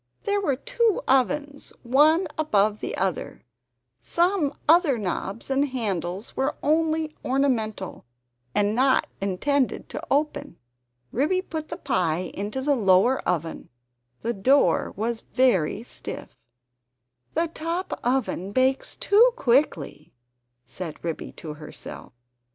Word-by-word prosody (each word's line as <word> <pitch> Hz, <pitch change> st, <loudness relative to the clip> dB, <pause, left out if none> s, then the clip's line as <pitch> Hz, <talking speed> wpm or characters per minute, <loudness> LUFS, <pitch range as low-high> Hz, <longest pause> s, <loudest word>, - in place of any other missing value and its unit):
There 405 Hz, 0 st, +1 dB
were 285 Hz, -9 st, +1 dB
two 470 Hz, -, 0 dB
ovens, 285 Hz, +2 st, +1 dB
one 300 Hz, +8 st, +4 dB
above 215 Hz, -9 st, +2 dB
the -, -, -4 dB
other; 190 Hz, -3 st, -2 dB, 0.6 s
some 340 Hz, -, +1 dB, 0.2 s
other 320 Hz, -5 st, +5 dB
knobs 200 Hz, +4 st, -4 dB
and 275 Hz, +2 st, +2 dB
handles 200 Hz, -5 st, -3 dB
were 265 Hz, +2 st, 0 dB
only 315 Hz, 0 st, +1 dB
ornamental 235 Hz, -, -1 dB, 0.5 s
and 205 Hz, 0 st, +2 dB
not 260 Hz, +3 st, +3 dB, 0.2 s
intended 250 Hz, +8 st, 0 dB
to -, -, -5 dB
open. 290 Hz, -, -1 dB, 0.5 s
Ribby 370 Hz, +9 st, +1 dB
put 315 Hz, -4 st, -5 dB
the 335 Hz, -, -5 dB
pie 180 Hz, -, -1 dB
into 210 Hz, +7 st, -4 dB
the 285 Hz, 0 st, +3 dB
lower 205 Hz, +3 st, +4 dB
oven; 165 Hz, -2 st, -2 dB, 0.5 s
the 235 Hz, +1 st, 0 dB
door 260 Hz, +8 st, +3 dB
was 225 Hz, +2 st, -2 dB
very 225 Hz, -6 st, +1 dB
stiff. -, -, -7 dB, 1.1 s
"The 335 Hz, -, +1 dB
top 335 Hz, +3 st, -3 dB
oven 240 Hz, -6 st, -1 dB
bakes 260 Hz, +2 st, +1 dB
too 465 Hz, +4 st, +5 dB
quickly," 235 Hz, -, 0 dB, 0.5 s
said 170 Hz, -4 st, -7 dB
Ribby 165 Hz, -2 st, -4 dB
to 155 Hz, -2 st, -8 dB
herself. 150 Hz, 0 st, -10 dB
260 Hz, 115 wpm, -25 LUFS, 200-305 Hz, 1.1 s, other